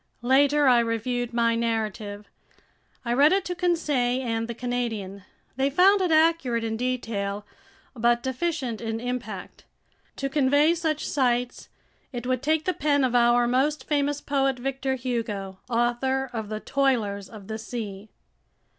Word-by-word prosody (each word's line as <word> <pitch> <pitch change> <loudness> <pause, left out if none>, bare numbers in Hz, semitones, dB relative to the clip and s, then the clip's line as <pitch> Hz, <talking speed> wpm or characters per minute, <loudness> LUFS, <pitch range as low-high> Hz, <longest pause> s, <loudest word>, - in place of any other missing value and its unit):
Later 285 +3 +4
I 245 -2 +6
reviewed 235 +1 -1
my 235 -1 +2
narrative. 215 -3 -2 0.8
I 235 - 0
read 285 +5 +5
it 385 0 +2
to 360 - -2
Conseil 290 -8 0
and 225 -1 -1
the 235 - -5
Canadian. 230 -5 -3 0.4
They 270 +1 +2
found 380 +7 +5
it 365 - +1
accurate 315 -7 +3
in 225 -1 -2
detail 220 -5 -3 0.5
but 240 0 +2
deficient 260 -4 -2
in 225 -1 -3
impact. 245 0 -5 0.5
To 275 - -2
convey 285 +3 +3
such 320 -3 -2
sights, 245 -3 0 0.4
it 245 -2 -5
would 255 -1 0
take 310 +2 +1
the 365 - +1
pen 285 -3 +1
of 255 -2 +1
our 240 0 +4
most 270 +5 0
famous 290 -1 0
poet, 270 -2 0
Victor 270 +1 -2
Hugo, 225 -7 -4
author 245 +2 0
of 220 -3 -4
The 215 0 -3
Toilers 225 -8 0
of 210 -3 -11
the 220 0 -5
Sea. 215 -3 -6
245 Hz, 145 wpm, -25 LUFS, 230-280 Hz, 0.8 s, I